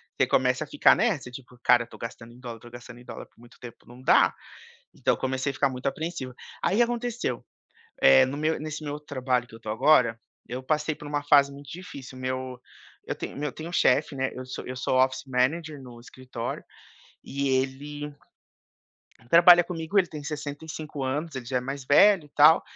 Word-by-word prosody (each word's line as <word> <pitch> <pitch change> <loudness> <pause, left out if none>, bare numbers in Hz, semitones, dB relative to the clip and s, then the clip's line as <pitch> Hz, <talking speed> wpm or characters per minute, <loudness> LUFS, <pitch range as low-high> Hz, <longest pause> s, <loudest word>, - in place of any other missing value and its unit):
você - - +2
começa 125 0 +2
a - - -10
ficar 295 - +5
nessa 175 - 0
tipo, 125 0 -12
cara 120 -1 +4
tô - - -13
gastando 115 0 -8
em 120 - -16
dólar 120 -3 -8
tô 120 - -13
gastando 120 0 -11
em 120 - -16
dólar - - -8
por - - -30
muito 120 +1 -17
tempo, 120 -3 -12
não 120 +2 -14
dá. 130 - +5 0.6
Então - - +1
eu - - -10
comecei 130 +1 -1
a - - -6
ficar 140 +1 +2
muito 125 -1 -6
apreensivo. 155 -2 -3 0.3
Aí, 195 +7 +1
aconteceu, 240 - -2 0.6
eh, 65 0 +7
no 135 +2 -4
meu 155 +1 0
nesse 155 +1 -6
meu 145 0 -4
trabalho 130 -4 -2
que 115 - -16
eu 115 - -12
tô 110 - -10
agora, 115 0 +3 0.3
eu 125 +2 -5
passei 150 +3 0
por 150 - -11
uma 145 0 -2
fase 140 -1 +5
muito 140 0 -12
difícil 140 -7 -9
meu 130 0 -4 0.5
eu - - -2
tenho - - -7
meu 150 +1 -2
eu - - -8
tenho 160 +5 -8
um - - -9
chefe, 145 -2 +2
né, 130 0 -1
eu 130 0 -7
sou 130 - -7
eu 130 - -5
sou 125 - -1
office 130 0 +2
manager 145 +4 -1
no 120 -2 -12
escritório, 125 -1 -7 0.6
e 140 0 -3
ele 140 +3 -2 1.2
trabalha 175 +2 +8
comigo. 165 +2 -3
Ele 190 -3 +4
tem 150 -3 -8
65 150 +1 -6
anos. 145 +4 -3
Ele 130 -2 -6
já 125 +1 -1
é - - -2
mais 135 +1 -6
velho 185 +4 +5
e - - -19
tal. 155 +3 +7
135 Hz, 205 wpm, -26 LUFS, 125-155 Hz, 1.2 s, trabalha